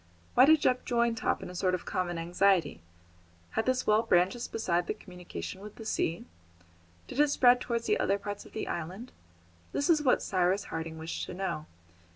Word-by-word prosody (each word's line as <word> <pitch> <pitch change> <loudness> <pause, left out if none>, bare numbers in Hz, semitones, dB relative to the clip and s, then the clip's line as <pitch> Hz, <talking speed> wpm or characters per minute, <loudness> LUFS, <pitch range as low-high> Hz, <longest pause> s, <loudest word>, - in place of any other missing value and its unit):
Why 255 - +7
did 310 +1 +5
Jup 255 -2 +2
join 235 -1 +1
Top 225 - -1
in - - -7
a - - -10
sort 185 0 +1
of 180 - -7
common 175 -2 -2
anxiety? 170 - +1 0.7
Had 220 - -1
this 255 0 +1
well 215 +1 +4
branches 190 +2 +2
besides 175 -6 -1
the - - -2
communication 180 - -8
with 210 0 -10
the 225 - -10
sea? 170 -5 -1 0.8
Did - - -6
it 295 - +6
spread 250 -3 +5
towards 235 -1 -2
other 195 +1 +2
parts 205 0 -6
of - - -16
the 220 - -4
island? 185 +9 -5 0.6
This 285 +4 +2
is 310 -2 +3
what 260 -4 +3
Cyrus 185 +1 +1
Harding 160 0 -4
wished 160 +1 -5
to - - -7
know. 185 -5 -3
200 Hz, 190 wpm, -30 LUFS, 175-235 Hz, 0.8 s, Why